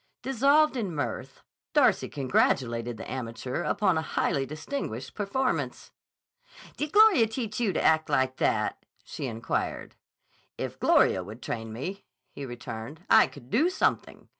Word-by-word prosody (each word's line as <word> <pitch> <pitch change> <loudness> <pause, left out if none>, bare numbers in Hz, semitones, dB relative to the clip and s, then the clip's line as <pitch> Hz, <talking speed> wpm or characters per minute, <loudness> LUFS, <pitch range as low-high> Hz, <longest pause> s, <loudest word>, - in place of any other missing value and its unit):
Dissolved 275 +3 +3
in 200 -9 -3
mirth, 145 - -4 0.3
Darcy - - +3
congratulated 120 -3 0
the - - -8
amateur 125 +2 -4
upon 185 -3 +1
a - - -1
highly 135 -3 -1
distinguished 155 - -5
performance. 250 +6 -2 0.8
"Did 300 0 -3
Gloria 415 - +6
teach 220 -1 -4
you 225 -5 +1
to - - -1
act 160 0 +3
like 130 0 +1
that?" - - 0 0.2
she 135 - -5
inquired. 115 -1 -3 0.6
"If - - -5
Gloria 95 - +4
would 105 +6 -10
train 115 -1 -4
me," 175 - -6 0.3
he 140 - -7
returned, 120 +5 -8
"I - - +7
could 130 -3 -14
do 315 +9 +3
something. 370 - -1
155 Hz, 140 wpm, -27 LUFS, -, 0.8 s, I